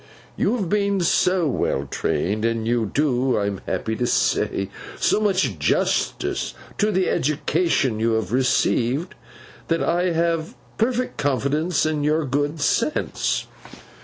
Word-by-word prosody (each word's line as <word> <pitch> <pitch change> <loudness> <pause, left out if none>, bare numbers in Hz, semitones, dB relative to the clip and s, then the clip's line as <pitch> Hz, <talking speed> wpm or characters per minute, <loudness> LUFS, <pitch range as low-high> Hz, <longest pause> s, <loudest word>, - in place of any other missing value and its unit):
You 215 - +1
have 200 -7 -2
been 200 0 +1
so 180 +1 +2
well 70 - -1
trained, 100 +9 -1
and 115 -1 0
you 115 -2 0
do, 130 -3 +1
I 100 - 0
am 100 -2 -3
happy 110 - -2
to 120 - 0
say, 100 -4 0 0.3
so - - +2
much 185 - +1
justice - - 0 0.2
to 210 +1 +2
the 185 -1 +1
education 145 -4 +1
you 115 +1 +1
have 110 -3 -1
received, 130 +4 +1 0.5
that 165 0 +1
I 175 +2 +1
have 165 -1 0 0.2
perfect 250 +2 0
confidence 145 +5 0
in 155 -2 0
your 155 +1 +1
good 145 +3 -1
sense. 230 - 0
145 Hz, 135 wpm, -22 LUFS, 120-180 Hz, 0.5 s, so